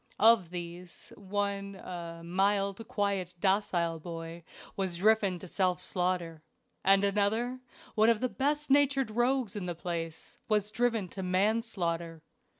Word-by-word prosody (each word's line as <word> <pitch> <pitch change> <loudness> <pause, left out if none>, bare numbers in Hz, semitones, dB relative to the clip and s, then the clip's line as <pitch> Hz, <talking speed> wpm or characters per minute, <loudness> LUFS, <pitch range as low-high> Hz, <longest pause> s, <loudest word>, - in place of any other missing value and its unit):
Of 220 -6 +5
these, 175 0 -8
one, 200 0 -2
"a 170 -2 -7
mild, 200 +4 +1
quiet, 200 -6 -1
docile 175 -4 +1
boy," 165 0 -7 0.3
was 190 -3 -2
driven 205 -1 +3
to 185 - -9
self 180 0 +1
slaughter; 175 -3 -1 0.4
and 195 +1 +5
another, 210 +5 +1 0.3
one 220 0 +4
of 230 -2 +3
the 255 - +1
best 295 +3 -1
natured 275 -3 +3
rogues 240 -1 +1
in 200 -3 -3
the 175 -1 -3
place, 165 -2 -5
was 210 -1 +2
driven 230 -3 +1
to 190 - -6
manslaughter. 185 -4 0
195 Hz, 135 wpm, -30 LUFS, 175-220 Hz, 0.4 s, Of